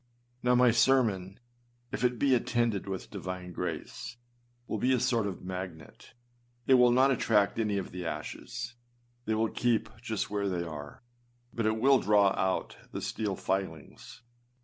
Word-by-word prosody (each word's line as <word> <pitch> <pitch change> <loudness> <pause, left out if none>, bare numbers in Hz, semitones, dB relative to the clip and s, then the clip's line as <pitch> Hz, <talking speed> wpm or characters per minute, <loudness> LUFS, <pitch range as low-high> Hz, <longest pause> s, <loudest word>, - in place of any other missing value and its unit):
Now, 125 0 +3
my 125 -1 +6
sermon 110 -7 +2 0.5
if - - -3
it 125 -1 +2
be 135 +1 +3
attended 120 -4 +1
with 95 -1 -5
divine 90 -2 -6
grace, 115 +6 -5 0.5
will 110 - -3
be 130 +5 +3
a 125 - +2
sort 115 -4 +1
of 95 -3 -6
magnet: 90 -1 -8 0.5
it 135 - +5
will 125 -1 +7
not 130 +3 +5
attract 110 -4 +2
any 105 -2 +1
of 95 - -4
the 90 0 -5
ashes 75 +7 -5
â 120 0 -39
they 110 - 0
will 110 0 +1
keep 115 -2 +1
just 110 -4 -3
where 100 -1 0
they 90 -2 -1
are 75 0 -8 0.5
â - - -20
but 115 -2 0
it 110 0 +1
will 135 +2 +5
draw 105 -2 +4
out 95 -1 -1
the - - -4
steel 105 -3 -2
filings. 95 - -4
110 Hz, 170 wpm, -30 LUFS, 95-120 Hz, 0.5 s, will